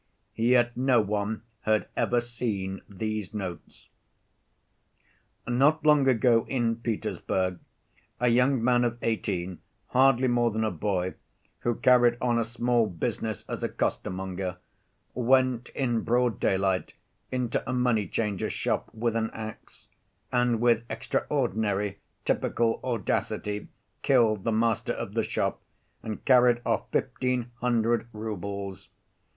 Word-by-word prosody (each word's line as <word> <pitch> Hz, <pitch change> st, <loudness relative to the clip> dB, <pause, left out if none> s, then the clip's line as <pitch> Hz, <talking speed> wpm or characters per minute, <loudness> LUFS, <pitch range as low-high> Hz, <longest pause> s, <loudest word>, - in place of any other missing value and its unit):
Yet 120 Hz, +1 st, +3 dB
no 125 Hz, -1 st, +3 dB
one 105 Hz, +1 st, -1 dB, 0.2 s
had 110 Hz, -1 st, +1 dB
ever 120 Hz, 0 st, +2 dB
seen 105 Hz, -5 st, -3 dB
these 110 Hz, +1 st, -4 dB
notes. 95 Hz, -4 st, -7 dB, 1.6 s
"Not 145 Hz, +6 st, +3 dB
long 150 Hz, -3 st, +5 dB
ago 120 Hz, -2 st, +3 dB
in 120 Hz, -3 st, 0 dB
Petersburg 95 Hz, -5 st, -2 dB, 0.6 s
a 125 Hz, -, +2 dB
young 125 Hz, +1 st, +3 dB
man 125 Hz, 0 st, +4 dB
of 120 Hz, -1 st, 0 dB
eighteen, 95 Hz, -5 st, -2 dB, 0.3 s
hardly 130 Hz, 0 st, +4 dB
more 120 Hz, -1 st, +3 dB
than 110 Hz, 0 st, -1 dB
a 110 Hz, -, 0 dB
boy, 95 Hz, 0 st, -1 dB, 0.5 s
who 120 Hz, -1 st, 0 dB
carried 120 Hz, -1 st, +4 dB
on 120 Hz, -1 st, +1 dB
a -, -, +2 dB
small 120 Hz, 0 st, +1 dB
business 110 Hz, +4 st, -3 dB
as -, -, -4 dB
a -, -, -1 dB
costermonger, 95 Hz, 0 st, -3 dB, 0.6 s
went 125 Hz, 0 st, +2 dB
in 120 Hz, -4 st, +1 dB
broad 120 Hz, -1 st, +1 dB
daylight 95 Hz, -1 st, 0 dB, 0.4 s
into 125 Hz, -2 st, -1 dB
a -, -, +1 dB
moneychanger's 115 Hz, -4 st, 0 dB
shop -, -, -1 dB
with 115 Hz, 0 st, -1 dB
an 110 Hz, -1 st, 0 dB
ax, 110 Hz, -1 st, -9 dB, 0.4 s
and 120 Hz, -2 st, +2 dB
with 120 Hz, -1 st, +3 dB
extraordinary, 100 Hz, -1 st, -1 dB, 0.3 s
typical 115 Hz, -1 st, +1 dB
audacity 105 Hz, -3 st, -2 dB, 0.3 s
killed 115 Hz, -7 st, +3 dB
the 115 Hz, -, +2 dB
master 115 Hz, 0 st, +1 dB
of -, -, -5 dB
the -, -, +1 dB
shop -, -, -2 dB, 0.4 s
and 110 Hz, -2 st, -6 dB
carried 125 Hz, -2 st, +5 dB
off -, -, 0 dB
fifteen 125 Hz, -1 st, -1 dB
hundred 120 Hz, -1 st, +1 dB
roubles. 100 Hz, -3 st, -5 dB
115 Hz, 125 wpm, -27 LUFS, 105-125 Hz, 1.6 s, long